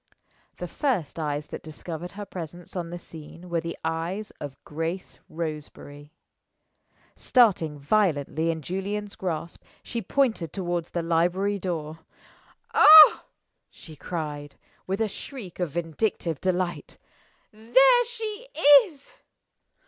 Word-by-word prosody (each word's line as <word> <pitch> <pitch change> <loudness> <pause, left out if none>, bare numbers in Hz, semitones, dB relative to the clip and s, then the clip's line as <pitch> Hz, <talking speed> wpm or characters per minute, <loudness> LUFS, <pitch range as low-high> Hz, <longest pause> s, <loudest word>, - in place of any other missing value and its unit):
The - - -5
first 215 - -2
eyes 150 -1 -2
that - - -7
discovered 165 +2 -8
her 205 +1 -7
presence 175 -1 -9
on 175 -2 -4
the 175 - -6
scene 165 +1 -12
were 170 -1 0
the 170 0 -6
eyes 170 +6 -3
of 145 -2 -7
Grace 165 +4 -5
Roseberry. 150 -2 -7 1.0
Starting 185 - +3
violently 160 -1 +1
in 160 -2 -3
Julian's 200 +4 -4
grasp, 170 -2 -5 0.2
she 235 - -4
pointed 225 - 0
toward 175 -3 -2
the 170 0 -4
library 180 +5 +1
door. 165 -4 -4 0.7
"Ah!" 310 0 +9 0.4
she 160 - -12
cried, 150 -2 -6 0.3
with 195 +3 -2
a 220 - +2
shriek 210 - -9
of 175 -3 -1
vindictive 165 0 -2
delight. 180 -1 -2 0.6
"There 485 - +4
she 450 0 -6 0.4
is!" 295 -8 -16
175 Hz, 120 wpm, -26 LUFS, 160-205 Hz, 1.0 s, Ah